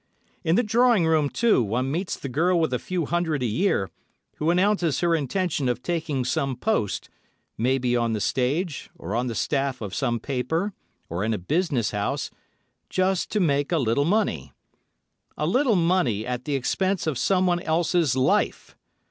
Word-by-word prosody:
In 165 0 +2
the 240 - +3
drawing 230 -3 +3
room, 155 -3 +2
too, 230 - +3
one 120 +5 -1
meets 175 +5 -2
the - - -6
girl 170 +7 +2
with 160 -5 0
a 125 - 0
few 180 -3 -2
hundred 160 -4 -1
a - - +1
year, 110 - 0 0.5
who 155 - 0
announces 180 -3 +2
her 170 -1 +2
intention 155 -2 0
of 125 0 -2
taking 155 -7 -2
some 135 0 -1
post—maybe 125 - -2
on 120 -1 +1
the 110 - -1
stage, 135 - -1
or 90 +5 -6
on 125 +2 0
the 115 - -3
staff 135 -1 -1
of 105 -3 -6
some 120 -4 0
paper, 150 - -2 0.3
or 85 +4 -3
in 110 +1 0
a - - -2
business 140 - 0
house, 105 -1 -2 0.6
"just 185 0 0
to 210 - +2
make 145 -5 +1
a 170 - +3
little 130 0 +1
money." 150 - 0 0.8
A 150 - -1
little 245 - +2
money 165 - +1
at 125 0 -4
the 145 -2 -1
expense 185 +8 0
of 155 -3 0
someone 180 -2 +2
else's 165 -4 +1
life! 130 0 0
150 Hz, 170 wpm, -25 LUFS, 125-180 Hz, 0.8 s, the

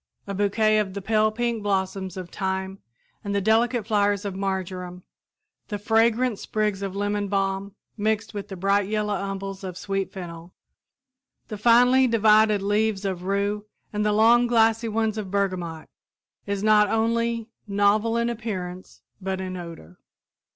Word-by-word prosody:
A 200 - -5
bouquet 215 +2 +2
of 195 -2 -2
the 200 - -4
pale 215 +1 +2
pink 235 0 -2
blossoms 190 -2 -2
of 180 -2 -7
thyme 190 0 -3 0.4
and 200 -1 -3
the - - +3
delicate 225 +2 +2
flowers 205 -1 +1
of 200 - -3
marjoram, 185 -2 -4 0.6
the 205 - -3
fragrant 225 +2 +2
sprigs 210 -2 -1
of 195 -1 -4
lemon 205 0 -1
balm 195 0 -1 0.2
mixed 215 +1 -1
with 205 -1 -5
the 195 - -7
bright 195 +2 +1
yellow 210 -1 0
umbels 195 0 -4
of 185 -2 -6
sweet 195 0 -3
fennel, 170 -2 -9 0.9
the 215 - -5
finely 245 +3 +5
divided 215 -2 +4
leaves 205 0 0
of 185 -2 -3
rue 200 +2 -1 0.3
and 210 0 0
the 210 - +2
long 230 +3 +5
glassy 225 -1 +3
ones 220 0 0
of 200 -3 -5
bergamot, 185 -5 -2 0.6
is 200 0 -2
not 210 -1 +5
only 230 0 0 0.2
novel 205 +3 +2
in 235 0 +1
appearance 190 -6 -5 0.2
but 190 0 -3
in 185 -1 -4
odor. 165 - -10
205 Hz, 150 wpm, -24 LUFS, 195-220 Hz, 0.9 s, finely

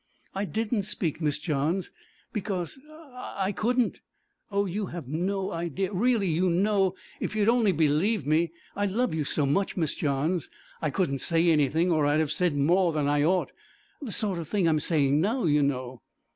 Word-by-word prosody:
'I 195 +1 -2
didn't 220 +1 -1
speak, 185 -5 -2
Miss 150 -2 +1
Johns, 155 +4 -1 0.4
because 200 0 -3
I 250 -11 -5
I - - 0
couldn't. 240 +4 0 0.5
Oh! 200 -1 +1
you 200 +2 -3
have 170 -7 -7
no 190 +6 -1
idea 175 +4 -2
really, 225 +1 +2
you 175 +3 +2
know, 190 +1 +2 0.2
if - - -3
you'd 210 -1 +2
only 230 -3 +4
believe 160 - +1
me 160 +2 +2 0.2
I 205 +1 0
love 230 +4 0
you 160 -1 0
so 145 0 0
much, 190 +10 0
Miss 160 -3 0
Johns, 150 +4 -1 0.3
I 155 - 0
couldn't 140 -3 -1
say 165 +2 +2
anything 160 +3 +2
or 155 -3 +3
I'd 145 +1 +3
have 155 -2 0
said 165 -2 +1
more 175 +5 +3
than 150 -2 0
I 145 0 +2
ought, 180 +3 +1 0.5
the 260 -7 -5
sort 200 -3 -1
of 165 - -6
thing 195 -2 +1
I'm 155 -1 +3
saying 150 -2 +2
now, 225 +6 0
you 150 -2 +3
know.' 130 -3 -2
175 Hz, 185 wpm, -27 LUFS, 150-200 Hz, 0.5 s, only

